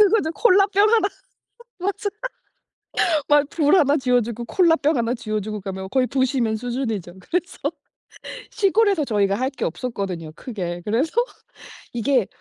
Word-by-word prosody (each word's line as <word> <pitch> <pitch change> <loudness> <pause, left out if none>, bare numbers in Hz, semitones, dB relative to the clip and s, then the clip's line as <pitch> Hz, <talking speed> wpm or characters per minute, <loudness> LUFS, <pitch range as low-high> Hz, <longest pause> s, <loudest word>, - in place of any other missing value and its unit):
그거죠. 320 -7 0
콜라병 400 0 +4
1 445 -3 +4 0.7
맞아. 400 +3 -2 1.2
막 295 -1 +4
불 300 -1 +3
1 290 -4 +4
쥐여 250 -3 +2
주고 235 +1 -5
콜라병 325 0 +3
1 235 0 0
쥐여 215 -4 -3
주고 215 +1 -5
가면 190 -1 -6
거의 260 -1 +2
부시맨 255 -4 0
수준이죠. 225 -7 -3
그래서 360 - -3 0.9
시골에서 400 -5 +2
저희가 200 -5 +1
할 260 +5 0
게 270 - -3
없었거든요, 180 -4 -4
크게. 175 -7 -5
그래서 240 +9 0 0.8
이게 240 -1 +1
255 Hz, 270 characters per minute, -22 LUFS, 215-325 Hz, 1.2 s, 콜라병